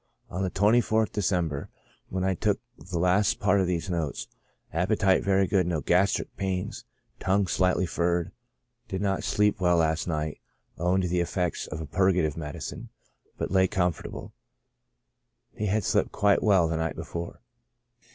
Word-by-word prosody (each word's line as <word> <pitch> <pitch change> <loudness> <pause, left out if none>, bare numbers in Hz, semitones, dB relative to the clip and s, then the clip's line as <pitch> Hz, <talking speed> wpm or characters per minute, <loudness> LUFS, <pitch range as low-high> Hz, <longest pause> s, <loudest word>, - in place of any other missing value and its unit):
On 90 - -3
the 95 - 0
24th 110 +1 +2
December, 85 -8 -1 0.4
when 95 0 -2
I 95 0 +2
took 85 - 0 0.2
the 90 +3 -6
last 90 +4 +2
part 100 -1 +3
of 95 - 0
these 85 -3 -1
notes, 80 -5 -3 0.5
appetite 95 +3 +2
very 95 0 +3
good; 95 -1 +1
no 85 -3 0
gastric 90 +5 +1
pains; 95 -2 -3 0.3
tongue 95 +1 +2
slightly 90 0 +1
furred 85 0 0 0.6
j 95 - -3
did - - -4
not 95 -1 0
sleep 105 -2 +1
well 90 -1 +4
last 80 0 +1
night, 75 -2 -2 0.4
owing 90 +3 +2
to 90 - 0
the 90 +1 0
effects 90 0 -2
of 80 - -5
a - - -4
purgative 90 -1 +2
medicine, 75 -3 -6 0.5
but - - -3
lay 95 -1 +4
comfortable; 90 -4 -2 1.2
he 105 - -3
had 105 +2 +1
slept - - +1
quite 100 0 +3
well 95 -6 +4
the 80 0 -1
night 80 -2 -2
before. 85 0 -6
90 Hz, 160 wpm, -27 LUFS, 85-95 Hz, 1.2 s, well